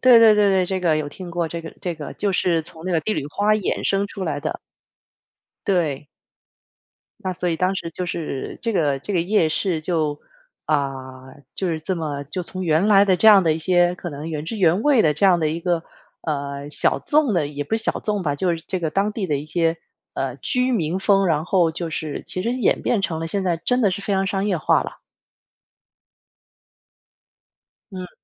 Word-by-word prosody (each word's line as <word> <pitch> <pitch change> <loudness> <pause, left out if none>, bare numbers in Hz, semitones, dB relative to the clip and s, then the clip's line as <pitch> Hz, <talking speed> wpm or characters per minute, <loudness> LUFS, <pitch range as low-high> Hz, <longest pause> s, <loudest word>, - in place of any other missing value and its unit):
对 250 -2 +8
对 220 -2 +7
对 205 -1 +4
对， 190 -1 +3
这 190 +1 -2
个 165 -3 +2
有 150 -1 -2
听 175 +3 -9
过， 170 -1 -1
这 170 +1 -5
个 165 - -9
这 175 -2 -3
个 150 -2 -8
就 200 -2 0
是 170 -3 +1
从 165 +1 -13
那 185 - -2
个 165 - +2
《帝 215 - 0
女 140 - -2
花》 205 +8 +1
衍 - - -2
生 200 +1 +1
出 200 -1 -7
来 145 -3 -2
的。 155 - -3 1.1
对。 160 -7 0 1.2
那 185 -1 -2
所 180 0 -2
以 165 - 0
当 185 +3 +1
时， 165 - -4
就 180 +2 -4
是， 160 -5 -4
这 230 -1 0
个 145 -7 +1
这 200 +9 -5
个 175 - +2
夜 175 -2 +2
市 165 0 -1
就 155 -3 -1 0.5
啊， 135 -3 -2 0.3
就 190 - -2
是 160 -1 -1
这 185 +4 -2
么， 145 -4 -4
就 180 +6 -4
从 185 +2 -3
原 165 +4 +2
来 200 -1 +6
的 190 -2 +3
这 220 - +6
样 200 -3 +8
的 160 - +4
一 160 - -2
些， 175 +1 +3
可 175 - -6
能 145 +3 -6
原 150 -1 -4
汁 220 - -4
原 180 +1 +3
味 280 -6 +4
的 150 - +3
这 180 +7 +2
样 180 -2 +5
的 155 -2 +1
一 165 +2 -3
个， 170 -2 0 0.4
呃， 140 -1 -4
小 140 - +1
众 280 - +2
的 155 -4 +1
也 145 0 -4
不 220 +10 -1
是 225 - -3
小 - - -1
众 210 -3 -1
吧， 145 -3 0
就 180 +5 0
是 165 - -8
这 185 - -1
个 160 -2 -1
当 200 +4 0
地 205 -4 -3
的 145 - 0
一 145 - -5
些， 165 +1 0 0.4
呃， 130 -2 -2
居 250 - 0
民 175 -3 0
风， 195 -1 +3
然 155 -1 +1
后 175 -3 +3
就 165 0 -4
是， 155 -1 -4
其 185 - -3
实 235 - 0
演 255 -2 +1
变 215 -5 0
成 160 -3 -2
了 165 - -2
现 195 +4 -1
在 170 -3 0
真 250 0 +2
的 200 - +4
是 185 - -3
非 200 0 -1
常 190 0 +1
商 195 0 -1
业 190 -4 +1
化 155 - +2
啦。 - - -8 3.0
嗯。 185 -1 -7
175 Hz, 240 characters per minute, -22 LUFS, 155-195 Hz, 3.0 s, 对